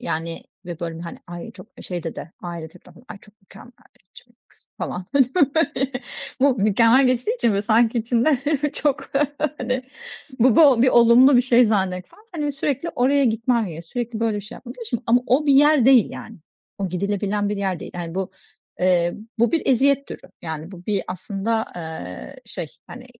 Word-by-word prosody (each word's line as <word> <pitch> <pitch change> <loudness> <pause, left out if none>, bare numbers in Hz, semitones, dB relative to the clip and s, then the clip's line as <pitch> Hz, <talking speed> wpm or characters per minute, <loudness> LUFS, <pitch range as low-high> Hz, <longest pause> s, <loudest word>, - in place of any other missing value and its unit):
Yani 165 -8 -4 0.2
ve 175 -2 -7
böyle, 165 -1 -5
hani, 170 0 -8
"Ay, 175 -1 -8
çok 185 -1 -13 0.2
şeyde 175 -3 -5
de, 165 - -8
ailede 170 -2 -7
de - - -17
var, 240 - -18
ay - - -9
çok 210 -1 -19
mükemmeliyetçi 200 -1 -18
bir 240 - -28
kız." - - -21
falan, 180 - -4
böyle. 265 -3 +4 1.1
Bu 275 0 +4
"mükemmel" 230 +6 +4
geçtiği 255 - 0
için 235 - +1
böyle 200 -1 0
sanki 225 +3 +3
içinde 240 +5 +1 0.4
çok, 290 0 -1 0.5
hani, 255 +1 -2 0.6
bu 245 -1 +4
bo 275 -7 +6
bir 260 - +5
olumlu 240 +3 +6
bir - - +6
şey 245 0 +4
zannetsen. 190 - -1
Hani, 305 -4 -3
bir - - 0
sürekli 280 +2 -2
oraya 275 +3 +2
gitmen 230 0 +1
gerekli 165 0 -8
sürekli 235 0 -4
böyle 225 -2 0
bir - - -3
şey 215 +4 -10
yapmadığı 250 0 -11
için. 240 -1 -3
Ama 245 +2 +3
o 270 +5 +2
bir 285 - +5
yer 295 -2 +5
değil 260 -5 +6
yani. 225 - -9 0.4
O 195 -1 -2
gidilebilen 200 +3 -1
bir 210 - -2
yer 190 -4 -2
değil. - - -9
Yani, 170 -1 -6
bu, 190 0 -3 0.5
eee, 175 -1 +2 0.2
bu 235 +6 +2
bir 330 - +1
eziyet 275 +2 +3
türü. - - -8 0.2
Yani, 160 +2 -6
bu 180 -1 -12
bir 205 -2 0
aslında, 200 +5 -2
eee, 90 - -8
şey, - - -6 0.2
hani, - - -10
225 Hz, 185 wpm, -22 LUFS, 185-255 Hz, 1.1 s, bo